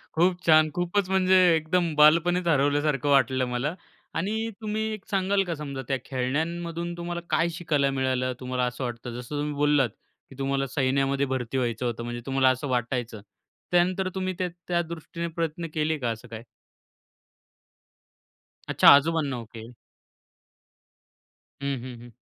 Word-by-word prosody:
खूप 175 +2 +2
छान, 155 -1 +6
खूपच 180 +3 -1
म्हणजे 190 -1 +3 0.2
एकदम 165 +1 0
बालपणीच 170 +4 +4
हरवल्यासारखं 145 -2 +2
वाटलं 135 -2 +3
मला 125 +6 -2 0.4
आणि 220 +7 -1
तुम्ही 215 0 -2
एक 215 -3 -9
सांगाल 195 0 +1
का, 175 -3 -3
समजा 140 -3 -6
त्या 135 - 0
खेळण्यांमधून 165 +6 -2
तुम्हाला 175 0 -4
काय 170 +1 +2
शिकायला 150 -5 +1
मिळालं, 130 -1 0
तुम्हाला 125 0 -2
असं 125 +2 -4
वाटतं? 120 0 -5
जसं 125 +4 -7
तुम्ही 150 0 -2
बोललात 145 -3 +2 0.4
की 135 - -13
तुम्हाला 135 0 0
सैन्यामध्ये 135 +1 +1
भरती 130 -1 -3
व्हायचं 120 -1 -1
होतं, 120 -1 -3
म्हणजे 120 0 -5
तुम्हाला 135 -1 +3
असं 130 +3 -1
वाटायचं, 120 -3 -2 0.5
त्यानंतर 185 +2 +2
तुम्ही 185 0 -2
त्या 185 - 0 0.2
त्या 175 -1 +1
दृष्टीने 170 0 -6
प्रयत्न 165 0 -3
केले 155 0 0
का 125 -5 -2
असं 115 +2 -8
काय? 115 -1 -8 2.2
अच्छा. - - +3
आजोबांना. 145 -3 +1
ओके. 115 0 -11 1.9
हं, 140 -3 -2
हं, 125 -2 -8
हं. 120 - -12
145 Hz, 145 wpm, -26 LUFS, 130-170 Hz, 2.2 s, छान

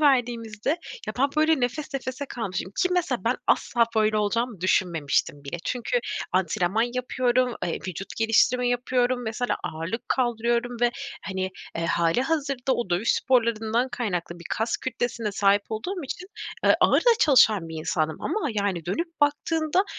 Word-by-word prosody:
verdiğimizde 235 -6 +1 0.4
ya, 215 - -2
ben, 275 +2 +4
böyle, 310 -2 +4
nefes 275 +4 -2
nefese 260 +1 -4
kalmışım 195 -6 -4
ki 365 - +3
mesela 355 -1 0
ben - - +2
asla 235 -1 +3
böyle 215 0 +3
olacağımı 215 0 0
düşünmemiştim 160 -6 +1
bile. 140 +5 -4
Çünkü 255 - 0 0.3
antrenman 185 +3 +1
yapıyorum, 250 -1 +1
eee, 170 - -2
vücut 185 +2 -6
geliştirme 240 +2 +3
yapıyorum, 245 0 +1
mesela 230 +2 -1
ağırlık 175 +10 -4
kaldırıyorum 240 -1 0
ve, 240 - +4 0.3
hani, 190 -1 -3 0.3
eee, 165 0 -1
hâlihazırda 260 - +1
o 235 -6 -3
dövüş 180 +6 +2
sporlarından 235 -1 +1
kaynaklı 190 -9 -3
bir 170 - -12
kas 225 +1 0
kütlesine 235 -3 -3
sahip 200 0 +3
olduğum 345 - -4
için, 360 +7 -6 0.4
eee, - - +6
ağır - - +5
da 480 - +5
çalışan 220 - +5
bir 160 - -7
insandım 155 -1 -1
ama, 415 -9 -1
yani, 200 -5 -1
dönüp 330 - -3
baktığında 315 +5 +2
235 Hz, 145 wpm, -25 LUFS, 195-255 Hz, 0.4 s, eee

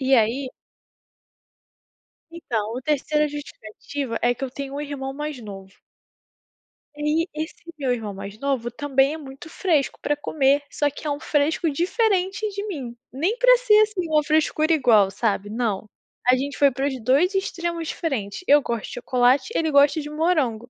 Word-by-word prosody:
E 265 0 +3
aí 245 +4 +2 1.8
Então, 230 -10 -3
o 255 - -4
3ª 300 +1 +1
a - - -1
justificativa 280 -2 -6
é 245 0 +2
que - - -7
eu 265 - -2
tenho 275 0 -6
um 290 - -3
irmão 280 -2 -5
mais 295 -2 -5
novo. 195 -2 -10 1.2
E 295 - -9 0.2
ai, - - -1 0.2
esse 320 - -10 0.2
meu 260 -3 +1
irmão 220 -4 -4
mais 200 +2 -8
novo, 265 -4 -1
também 275 +2 +1
é - - -5
muito 275 +2 -11
fresco 320 -6 0
para 295 - 0
comer, 285 -1 +2
só 290 - 0
que 290 +2 -8
é - - 0
um 285 0 -2
fresco 310 +2 +1
diferente 380 - 0
de 405 +1 -5
mim. 260 -11 -5 0.2
Nem 355 - 0
para - - +6
ser, 440 -4 +5
assim, 420 -5 +1
uma 305 -1 +3
frescura 310 +1 +2
igual, 220 -9 +4
sabe, 205 0 -1
não. 215 -3 -2 0.4
A 255 - +7
gente 280 +2 -3
foi 285 -1 +5
para 270 +1 -3
os 260 -4 -4
2 285 - +3
extremos 340 -4 -2
diferentes, 270 - -3
eu 290 +1 +6
gosto 235 -4 -3
de - - -9
chocolate, 250 - +2
ele 320 -1 +1
gosta 285 +2 +4
de 295 - -7
morango. 300 -8 0
285 Hz, 175 wpm, -23 LUFS, 245-315 Hz, 1.8 s, A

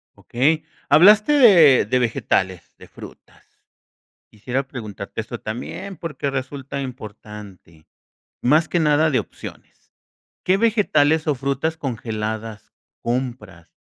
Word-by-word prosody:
Okey, 155 +6 0 0.2
hablaste 205 - +6 0.5
de 125 +4 +1
vegetales, 100 -7 -1
de - - -15
frutas. - - -16 0.7
Quisiera 125 +5 -4
preguntarte 110 -5 -7
esto, 115 +1 -8
también, 120 - -7
porque 150 -4 -4
resulta 135 +1 -5
importante, 105 - -11 0.5
más 155 +6 +3
que 175 - 0
nada 155 0 +3
de 130 - +2
opciones, - - -11 0.5
¿qué 185 +1 +3
vegetales 190 -9 +2
o 150 - +3
frutas 140 +4 -2
congeladas 110 -5 -5 0.3
compras, 120 -8 -4
130 Hz, 105 wpm, -21 LUFS, 110-150 Hz, 0.7 s, hablaste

